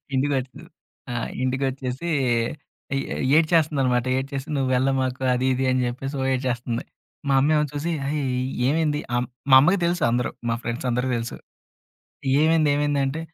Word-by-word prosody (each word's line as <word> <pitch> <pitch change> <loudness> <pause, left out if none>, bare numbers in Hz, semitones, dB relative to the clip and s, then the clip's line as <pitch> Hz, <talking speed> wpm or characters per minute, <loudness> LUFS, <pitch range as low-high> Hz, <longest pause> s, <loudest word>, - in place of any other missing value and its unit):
ఇంటికొచ్చి, 135 -1 -1 0.5
ఆ! - - -3 0.3
ఇంటికొచ్చేసి 130 +2 -2 0.2
ఏ - - +3 0.6
ఏ - - +1 0.4
ఏడ్చేస్తుందన్నమాట. 150 -7 +2
ఏడ్చేసి 135 +1 -4
"నువ్వేళ్ళామాకు 130 0 +1
అది 125 +1 0
ఇది" 130 +1 0
అని 130 0 +1
చెప్పేసి 135 +3 -5
ఓ - - 0
ఏడ్చేస్తుంది. 120 -2 -2 0.4
మా 140 - +3
అమ్మ 140 +3 +2
ఏమో 150 0 +3
చూసి 150 +4 -2 0.2
"అ‌యి 150 +1 -1 0.5
ఏమైంది?" 150 0 +1 0.2
హ్మ్, 120 0 0 0.2
మా - - +10
అమ్మకి 180 +7 +3
తెలుసు 175 +1 0
అందరు 120 +1 0 0.2
మా 115 - +1
ఫ్రెండ్స్ 120 +1 -4
అందరు 125 +2 0
తెలుసు. 115 0 -4 1.0
"ఏమైంది? 160 -1 +4
ఏమైందంటే?", 145 0 0
135 Hz, 140 wpm, -24 LUFS, 125-150 Hz, 1.0 s, మా